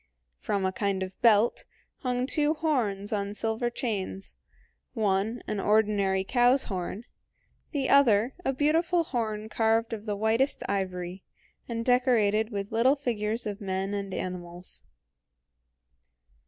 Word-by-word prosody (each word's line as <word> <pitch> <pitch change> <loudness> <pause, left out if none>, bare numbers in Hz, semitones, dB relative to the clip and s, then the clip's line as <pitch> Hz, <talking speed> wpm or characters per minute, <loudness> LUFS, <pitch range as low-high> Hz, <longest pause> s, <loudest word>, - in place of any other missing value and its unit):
From 200 -2 -1
a 190 - +1
kind 195 -1 -1
of 185 0 -9
belt 225 0 +4 0.3
hung 250 -1 -1
two 300 +3 +2
horns 225 -11 -1
on 200 0 -2
silver 225 +2 -1
chains, 200 -5 -4 0.6
one 215 +2 0
an 210 - -3
ordinary 205 -2 +2
cow's 245 +5 +3
horn, 190 +3 -4 0.7
the 275 -4 -1
other 245 -3 +4
a 270 - +1
beautiful 325 +5 +2
horn 220 -7 -3
carved 225 +1 +1
of 215 0 -6
the 205 - -1
whitest 225 +6 +1
ivory, 185 -1 -3 0.5
and 230 -1 -3
decorated 225 -4 +3
with 200 -2 -4
little 240 +5 +4
figures 230 -5 -2
of 210 0 -5
men 195 0 -2
and 200 -1 -3
animals. 180 -1 -5
215 Hz, 125 wpm, -28 LUFS, 200-245 Hz, 0.7 s, belt